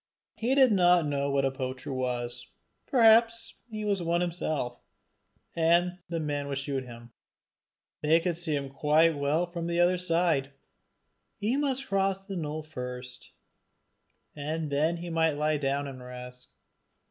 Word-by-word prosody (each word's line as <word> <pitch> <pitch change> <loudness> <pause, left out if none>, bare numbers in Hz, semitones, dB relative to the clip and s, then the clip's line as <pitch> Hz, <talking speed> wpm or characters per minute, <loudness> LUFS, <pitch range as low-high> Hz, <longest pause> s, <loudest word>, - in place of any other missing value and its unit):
He 235 +5 0
did 265 -3 +6
not 180 -4 +5
know 140 -1 -1
what 140 -1 +1
a 135 - +1
poacher 130 0 -5
was: 125 -1 -3 0.4
perhaps 230 -1 +4 0.2
he 215 -1 -5
was 200 -3 0
one 170 +1 +1
himself, 155 -8 -2 0.8
and 170 +2 +2
the 170 -1 -2
man 145 -2 -2
would 140 -1 -3
shoot 140 -1 -2
him. 120 -1 -12 0.9
They 155 +2 +4
could 170 0 -1
see 165 -3 -2
him 140 -1 -3
quite 155 +3 +3
well 145 +4 +1
from 170 -1 -5
the 170 0 0
other 175 +1 +4
side! 165 -6 +1 0.8
he 220 +5 -1
must 275 -2 0
cross 195 0 0
the 195 -1 -6
knoll 155 -2 -4
first, 125 -4 -7 1.0
and 155 +1 -3
then 155 +4 +1
he 170 0 -6
might 160 -1 +2
lie 150 +1 +1
down 140 0 -1
and 130 -2 -8
rest. 125 0 -9
155 Hz, 150 wpm, -28 LUFS, 140-180 Hz, 1.0 s, did